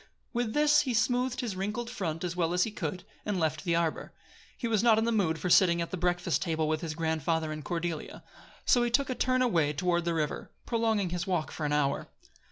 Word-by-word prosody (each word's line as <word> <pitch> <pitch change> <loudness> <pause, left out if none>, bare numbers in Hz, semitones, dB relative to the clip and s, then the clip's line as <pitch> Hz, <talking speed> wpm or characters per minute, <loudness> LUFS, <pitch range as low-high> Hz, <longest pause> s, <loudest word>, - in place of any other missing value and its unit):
With 235 -2 -1
this 300 0 +5
he 260 -5 -2
smoothed 250 +3 +1
his 225 -6 -3
wrinkled 210 +5 -3
front 175 -9 -4
as 175 -1 -3
well 170 -1 0
as 180 - +4
he 225 - -2
could, 180 -2 -4 0.2
and 205 -3 -1
left 155 -1 -1
the 170 -3 +1
arbor. 165 -2 -1 0.4
He 235 - -2
was 220 -3 +2
not 230 -2 +5
in 220 - +2
the 235 - +1
mood 185 -8 +1
for 180 +1 -2
sitting 170 -2 +5
at 170 - -3
the - - -2
breakfast 175 -1 0
table 160 -3 0
with 155 0 0
his 160 -2 -4
grandfather 160 0 -1
and 155 -1 -6
Cordelia; 170 -2 -4 0.4
so 245 - +4
he 240 - +1
took 265 +2 +1
a - - +1
turn 255 0 +2
away 165 -11 +2
toward 175 +2 0
the 170 -1 0
river, 155 -2 -2 0.2
prolonging 225 -6 0
his 175 +1 -3
walk 175 -4 -1
for 150 - -3
an - - -2
hour. 145 -1 0
180 Hz, 230 wpm, -29 LUFS, 160-225 Hz, 0.4 s, this